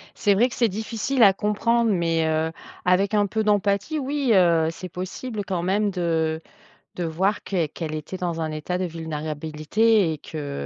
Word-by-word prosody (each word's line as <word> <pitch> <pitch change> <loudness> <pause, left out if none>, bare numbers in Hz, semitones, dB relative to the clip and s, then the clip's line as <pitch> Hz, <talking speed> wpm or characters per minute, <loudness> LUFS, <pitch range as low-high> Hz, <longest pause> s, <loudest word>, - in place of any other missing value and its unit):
C'est 205 - +3
vrai 235 +6 +4
que - - -9
c'est 235 -2 +2
difficile 220 +5 -1
à 200 -3 +8
comprendre, 225 +4 +1
mais, 165 -2 +1
heu, 160 0 0 0.3
avec 190 +3 +2
un 205 -1 +3
peu 220 +2 -1
d'empathie, 205 - +1
oui, 275 -2 -1
heu, 170 -4 +4
c'est 180 +2 -8
possible 200 +5 -5
quand 185 -3 -2
même 205 +3 +1
de 165 -3 0 0.6
de 175 - -2
voir 190 +6 0
qu'elle 170 -6 -1
qu'elle 155 0 -5
était 155 +5 -6
dans 170 -2 -3
un 160 -1 -2
état 155 +4 -3
de 185 - -2
vulnérabilité 160 +5 0
et 155 - -4
que, 145 - -6
185 Hz, 180 wpm, -24 LUFS, 160-210 Hz, 0.6 s, à